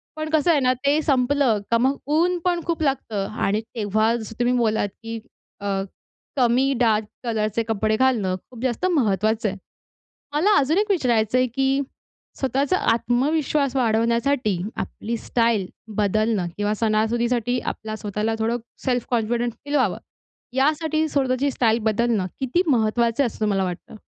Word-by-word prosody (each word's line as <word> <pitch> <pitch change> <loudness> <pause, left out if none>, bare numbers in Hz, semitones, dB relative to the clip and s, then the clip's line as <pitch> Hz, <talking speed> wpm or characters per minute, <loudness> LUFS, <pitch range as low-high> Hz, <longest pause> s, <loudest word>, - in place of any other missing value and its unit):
पण 310 0 -4
कसं 315 +1 +3
आहे 305 - +4
ना, 255 -1 +3
ते 280 +4 +1
संपलं 265 -4 +2
का 230 - +5
मग 265 +4 +1 0.2
ऊनपण 350 +1 +1
खूप 335 -2 -2
लागतं 225 -8 -1 0.2
आणि 205 +2 +1
तेव्हा 220 0 0
जसं 225 -1 -7
तुम्ही 245 +1 +2
बोललात, 220 -3 +1
की 225 0 -5 0.4
अ, 200 - -3 0.7
कमी 255 +2 +3
डार्क 220 -3 +3 0.2
कलरचे 225 -1 -1
कपडे 220 0 +1
घालणं 230 -7 +2
खूप 240 -3 -11
जास्त 255 +6 -1
महत्त्वाचं 215 - +1
आहे. 195 - -6 0.8
मला 395 +8 +4
अजून 300 +6 +2
एक 420 +1 0
विचारायचंय, 255 - +2
की 270 +3 0 0.6
स्वतःचा 275 +6 +1
आत्मविश्वास 275 +4 +1
वाढवण्यासाठी 235 -1 +1 0.2
आपली 230 +2 -4
स्टाईल 230 -5 +1 0.3
बदलणं 215 -1 +1
किंवा 205 +1 0
सणासुदीसाठी 235 +2 +1
आपला 215 0 -7
स्वतःला 210 +1 -2
थोडं 225 +2 0 0.3
सेल्फ 250 -3 0
कॉन्फिडेंट 235 0 0
फील 285 +1 -4
व्हावं, 255 -10 +2 0.6
यासाठी 310 +3 +1
स्वतःची 270 -1 +1
स्टाईल 230 -3 +2
बदलणं 220 -3 +1
किती 270 +8 +1
महत्त्वाचं 235 +1 +2
असं 230 - -7
तुम्हाला 200 -3 +1
वाटतं? 180 +4 -6
240 Hz, 140 wpm, -23 LUFS, 220-275 Hz, 0.8 s, का